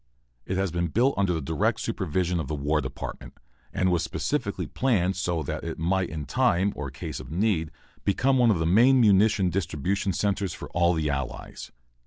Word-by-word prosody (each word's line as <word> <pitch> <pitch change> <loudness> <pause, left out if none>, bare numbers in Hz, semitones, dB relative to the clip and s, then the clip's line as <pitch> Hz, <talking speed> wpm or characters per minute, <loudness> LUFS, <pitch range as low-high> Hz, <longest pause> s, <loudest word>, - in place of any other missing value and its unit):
It 95 - -1
has 95 -2 0
been 85 +1 -1
built 120 - +2
under 100 -2 +1
the 80 -2 -1
direct 80 +2 0
supervision 90 +1 -1
of 75 - -3
the 75 - -2
War 75 +2 0
Department, - - -7 0.3
and 95 0 +1
was 85 -2 +2
specifically - - -2
planned 95 -8 +1
so 85 -3 -1
that - - -4
it 80 - -5
might 90 +3 0
in 75 -2 -5
time, 100 - +2
or 75 -2 -4
case 70 +2 -6
of - - -10
need, 85 -2 0 0.3
become 130 +7 +2
one 120 -2 +5
of 105 - +3
the 80 - -1
main 120 +10 +5
munition 100 -3 +4
distribution 95 +2 -1
centres 100 -1 -1
for - - -9
all 85 +1 +2
the 75 -2 0
Allies. 70 -3 -5
90 Hz, 190 wpm, -26 LUFS, 80-100 Hz, 0.3 s, one